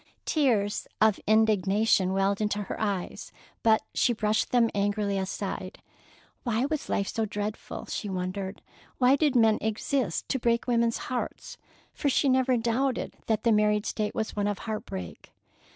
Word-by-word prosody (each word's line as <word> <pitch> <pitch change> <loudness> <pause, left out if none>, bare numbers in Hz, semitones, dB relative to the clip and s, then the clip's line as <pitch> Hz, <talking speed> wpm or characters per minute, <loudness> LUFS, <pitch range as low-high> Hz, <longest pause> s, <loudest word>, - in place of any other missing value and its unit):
Tears 230 -10 +1
of 215 -2 +4
indignation 210 -2 +3
welled 195 +2 +1
into 210 -1 0
her 195 - -6
eyes, 200 -4 -3 0.3
but 220 -1 +4
she 245 - +2
brushed 215 -1 0
them 235 -2 +3
angrily 205 0 0
aside. 190 0 -4 0.6
Why 235 0 0
was 305 0 -3
life 200 - 0
so 225 - -1
dreadful, 210 0 -5
she 210 - -4
wondered. 190 +1 -4 0.3
Why 255 +1 +5
did 285 -2 +1
men 225 -3 +4
exist 220 -1 -1
to 265 - 0
break 235 0 +1
women's 235 -2 +2
hearts?—for 255 +3 -5
she 275 +1 +2
never 260 -1 +3
doubted 240 +3 -1
that 220 -1 0
the 235 - +4
married 210 -1 +3
state 210 -1 -2
was 220 -1 -2
one 205 -1 0
of 205 -1 -1
heart 220 -1 -4
break. 90 -3 -8
215 Hz, 150 wpm, -28 LUFS, 200-235 Hz, 0.6 s, Why